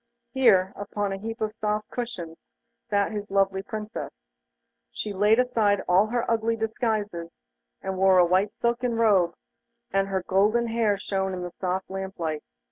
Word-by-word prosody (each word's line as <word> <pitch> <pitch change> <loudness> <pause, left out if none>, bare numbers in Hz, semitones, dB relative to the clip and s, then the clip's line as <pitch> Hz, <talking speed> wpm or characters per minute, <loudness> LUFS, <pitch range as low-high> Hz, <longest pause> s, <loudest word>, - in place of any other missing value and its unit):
There, 200 -8 +4
upon 205 0 -3
a - - -3
heap 225 +3 -6
of 215 0 -1
soft 210 -1 -2
cushions, 180 -10 -6 0.4
sat 200 0 +1
his 210 -1 -5
lovely 195 -1 +2
Princess. 215 +2 -7 0.6
She 215 - -4
had 195 - -7
laid 210 +2 +5
aside 220 -5 +2
all 190 +4 +4
her 240 +1 -1
ugly 230 0 +1
disguises 215 -6 -2 0.4
and 190 -1 -3
wore 190 -1 +5
a 180 - +7
white 190 +4 +2
silken 235 +1 -1
robe, 195 -7 +3 0.6
and 195 0 +2
her 190 -2 -1
golden 215 +6 +2
hair 225 -3 +1
shone 190 -1 -2
in 180 - -5
the 175 - -5
soft 185 +1 -3
lamp 190 0 -6
light. 155 -3 -2
205 Hz, 165 wpm, -26 LUFS, 190-225 Hz, 0.6 s, a